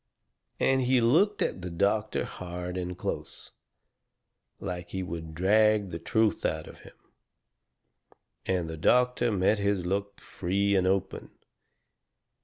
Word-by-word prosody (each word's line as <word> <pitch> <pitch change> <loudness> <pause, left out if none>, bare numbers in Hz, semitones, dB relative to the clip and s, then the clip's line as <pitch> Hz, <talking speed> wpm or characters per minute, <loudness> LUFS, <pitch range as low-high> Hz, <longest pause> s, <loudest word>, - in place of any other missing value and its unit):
And 135 0 +3
he 130 0 +3
looked 165 - +3
at - - -3
the 90 - -5
doctor 100 +5 0
hard 90 0 -6
and 90 -1 -4
close, - - -5 1.1
like 90 +1 -5
he 95 -1 -3
would 80 -2 -6
drag 105 +2 +3
the 85 - -5
truth 110 +5 +1
out 80 0 -1
of - - -13
him, - - -15 1.5
and 90 -3 0
the 80 0 -6
doctor 125 +6 +3
met 100 +1 +2
his 100 -3 0
look 100 +2 -2
free 100 +3 -1
and 95 -1 +2
open. 95 0 -1
95 Hz, 130 wpm, -28 LUFS, 90-110 Hz, 1.5 s, And